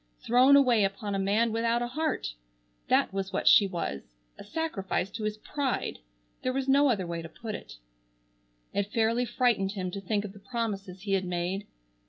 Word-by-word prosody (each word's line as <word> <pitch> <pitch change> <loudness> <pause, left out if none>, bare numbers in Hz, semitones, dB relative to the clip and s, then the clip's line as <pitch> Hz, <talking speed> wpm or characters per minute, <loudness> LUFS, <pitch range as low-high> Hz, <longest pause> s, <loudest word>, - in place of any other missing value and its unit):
Thrown 255 +4 +6
away 250 -6 +5
upon 200 +1 -2
a 195 - 0
man 210 +4 +2
without 230 +1 +1
a 240 - -3
heart! 305 - -2 0.5
That - - +3
was 195 -1 -3
what 190 - -2
she 200 - +8
was! 70 - -5 0.2
A - - -8
sacrifice 205 - -2
to 220 +1 -5
his 215 0 -2
pride! 275 +3 -2 0.4
There 255 - -1
was 270 0 -2
no 280 +1 +5
other 200 -7 +1
way 170 -1 -4
to 165 - -8
put 225 +3 -7
it. - - -8 1.0
It 200 0 -1
fairly 230 +2 +2
frightened 220 -5 +1
him 185 -3 -3
to 200 - -5
think 205 +2 -1
of 195 - -7
the 205 - -13
promises 195 -5 -4
he 200 0 -4
had 190 -1 +1
made. 180 +3 -2
210 Hz, 190 wpm, -29 LUFS, 195-240 Hz, 1.0 s, she